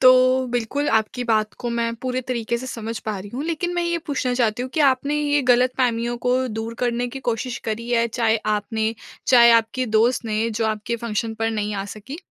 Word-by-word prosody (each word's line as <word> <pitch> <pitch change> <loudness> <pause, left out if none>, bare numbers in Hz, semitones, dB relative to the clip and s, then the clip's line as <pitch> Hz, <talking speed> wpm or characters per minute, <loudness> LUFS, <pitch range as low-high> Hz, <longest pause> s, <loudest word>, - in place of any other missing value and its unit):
तो 255 -1 +9 0.4
बिल्कुल 245 +5 -1
आपकी 220 +3 -1
बात 215 -2 +1
को 240 - -3
मैं 235 0 -1
पूरे 255 0 -1
तरीक़े 235 -2 -1
से 260 - -7
समझ 230 -2 -5
पा 210 -2 -2
रही 200 +2 -9
हूँ। 275 +4 -3
लेकिन 340 +2 -2
मैं 350 - 0
ये 340 0 0
पूछना 265 -3 -1
चाहती 240 -1 +1
हूँ 255 - -5
कि 315 - +1
आपने 270 +3 0
ये 290 -1 +2
ग़लतफ़हमियों 240 -1 +2
को 250 +1 +4 0.2
दूर 225 +1 -4
करने 245 0 0
की 270 - -5
कोशिश 235 +2 -3
करी 225 +2 -3
है? 235 -1 +3
चाहे 230 -1 +1 0.2
आपने, 220 +1 -1 0.3
चाहे 240 -2 +7
आपके 230 +2 +2
दोस्त 240 +2 +2
ने 220 +1 0
जो 225 0 -1
आपके 215 +2 -2
फ़ंक्शन 225 -1 -3
पर 225 - +2
नहीं 210 -1 -2
आ 195 - -3
सकीं? 265 +10 -8
235 Hz, 210 wpm, -22 LUFS, 225-255 Hz, 0.4 s, तो